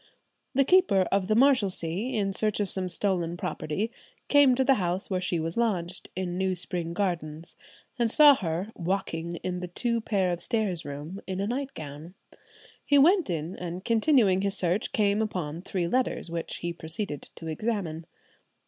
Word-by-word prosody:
The 275 0 +4
keeper 365 - +4
of 195 -1 +1
the 215 - +2
Marshalsea, 220 -4 +2
in 195 -1 0
search 215 +1 0
of 205 -3 0
some 185 -1 +1
stolen 175 -2 0
property, 175 +8 -3 0.4
came 285 -3 +6
to 265 - +2
the 270 +1 +5
house 180 +3 -2
where 185 -1 0
she 175 -2 0
lodged, 180 +1 -1
in 180 -1 -3
New 190 -1 +1
Spring 170 -1 -2
Gardens, 170 -4 -3 0.4
and 235 -1 +3
saw 295 +4 +8
her 185 -2 -3
"walking 170 -2 -3
in 180 -1 -2
the 180 - -5
two 235 +6 -1
pair 195 -5 0
of 175 - -5
stairs 210 -8 -1
room 145 +7 -7
in 190 0 -3
a 200 - 0
nightgown." 180 - -5 0.7
He 285 - +3
went 340 - +5
in, 165 +1 -3
and 180 +1 -6
continuing 225 -5 +3
his 200 0 -1
search, 180 +3 0
came 205 0 +2
upon 175 -7 -3
three 180 -2 -2
letters, 250 -5 -1
which 170 -1 -3
he 170 0 -4
proceeded 160 -1 -5
to 165 - -10
examine. 165 -2 -3
190 Hz, 165 wpm, -27 LUFS, 170-220 Hz, 0.7 s, saw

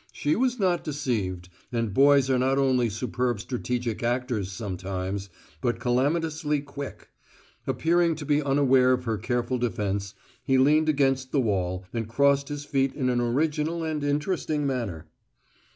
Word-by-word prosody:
She 150 +1 0
was 250 +1 +1
not 185 -5 +1
deceived, 110 - -2 0.2
and 115 -4 -1
boys 140 +2 +5
are 130 -1 +2
not 135 +2 +2
only 130 -3 +2
superb 120 +1 -2
strategic 120 0 -3
actors 120 -5 -1
sometimes, 95 -1 -4 0.3
but 120 -2 0
calamitously 150 +4 0
quick. 140 -1 -8 0.6
Appearing 170 0 +2
to 150 -1 -7
be 145 +1 +2
unaware 135 -2 +4
of 125 0 -1
her 115 -3 -2
careful 120 +1 -1
defence, 100 -4 -2 0.3
he 135 - +2
leaned 150 +4 +4
against 135 -3 +1
the 145 - +2
wall 95 -5 -1
and 115 -2 -3
crossed 140 +3 +2
his 145 0 -5
feet 135 -2 0
in 130 -3 0
an 120 -1 +1
original 150 +6 0
and 155 -2 -2
interesting 150 +1 -1
manner. 115 - -3
130 Hz, 150 wpm, -26 LUFS, 115-145 Hz, 0.6 s, boys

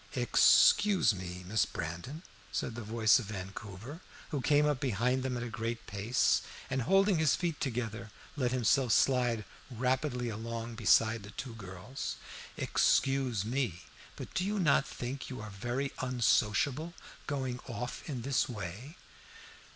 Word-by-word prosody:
"Excuse 205 - +5
me, 90 -1 -7
Miss 110 +2 +2
Brandon," 85 - -6 0.3
said - - -2
the 120 - -6
voice 110 +2 +4
of 120 - -5
Vancouver, 100 - -7 0.3
who 145 - -2
came 145 +2 +4
up 145 -3 +1
behind 125 0 +1
them 130 -1 -2
at 120 - -3
a - - -4
great 115 -1 -4
pace, 105 +5 +1 0.3
and 130 - 0
holding 195 - +3
his 160 -2 +4
feet 170 -4 -2
together 115 -4 -3 0.3
let 125 -4 0
himself 130 -1 +3
slide 120 -5 +2 0.2
rapidly 125 +1 -1
along 115 +1 -5
beside 110 0 +3
the 100 - -10
two 115 +4 -7
girls, 100 +4 -6 0.4
"excuse 130 -6 +2
me, 115 -7 -2 0.3
but - - -8
do - - 0
you 205 +2 -1
not 150 -7 +3
think 130 +3 -5
you 130 - -6
are 110 -1 -7
very 120 +8 -3
unsociable, 130 +5 +1 0.3
going 130 -4 -2
off 120 0 -5
in 125 -5 -4
this 135 0 +1
way?" 110 - -7
125 Hz, 145 wpm, -32 LUFS, 110-135 Hz, 0.4 s, Excuse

